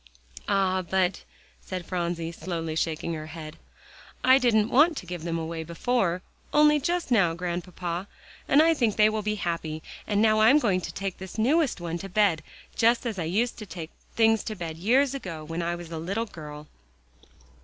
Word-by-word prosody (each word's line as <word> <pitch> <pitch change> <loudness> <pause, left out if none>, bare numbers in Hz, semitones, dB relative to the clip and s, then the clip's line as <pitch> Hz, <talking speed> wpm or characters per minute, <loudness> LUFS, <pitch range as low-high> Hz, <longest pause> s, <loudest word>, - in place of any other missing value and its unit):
"Ah, 190 -2 +2
but," 185 +1 0 0.4
said 185 -2 -5
Phronsie, 170 -2 -2
slowly 165 -2 -4
shaking 160 +1 -1
her 155 -1 -6
head, 155 0 -8 0.7
"I 260 +1 +7
didn't 220 -4 +3
want 305 +4 +5
to - - -6
give 175 -1 -6
them 165 -1 -2
away 165 0 -4
before; 180 +2 0 0.3
only 300 0 +5
just 340 0 -1
now, 175 -8 +4
Grandpapa, 175 +1 -4 0.4
and 290 +3 +6
I 330 0 +5
think 235 -9 +1
they 215 0 +5
will 215 0 -2
be 210 0 -1
happy. 165 -5 -3 0.2
And 205 -1 +1
now 215 0 +4
I'm 230 +7 +7
going 200 -10 +2
to - - -5
take 195 -2 -4
this 190 +2 -8
newest 275 - +2
one 170 0 -4
to 195 - -7
bed, 190 -4 +2 0.3
just 235 +2 +3
as 220 -5 -3
I 165 - -1
used 220 +10 0
to 215 - -8
take 170 -3 -7 0.2
things 225 -1 +4
to 215 - -4
bed 165 -4 -6
years 255 +9 +3
ago, 185 - -6
when 165 +2 -4
I 170 +1 -1
was 175 -1 -9
a 165 - -4
little 195 +8 -2
girl." 150 -6 -9
185 Hz, 185 wpm, -27 LUFS, 170-225 Hz, 0.7 s, I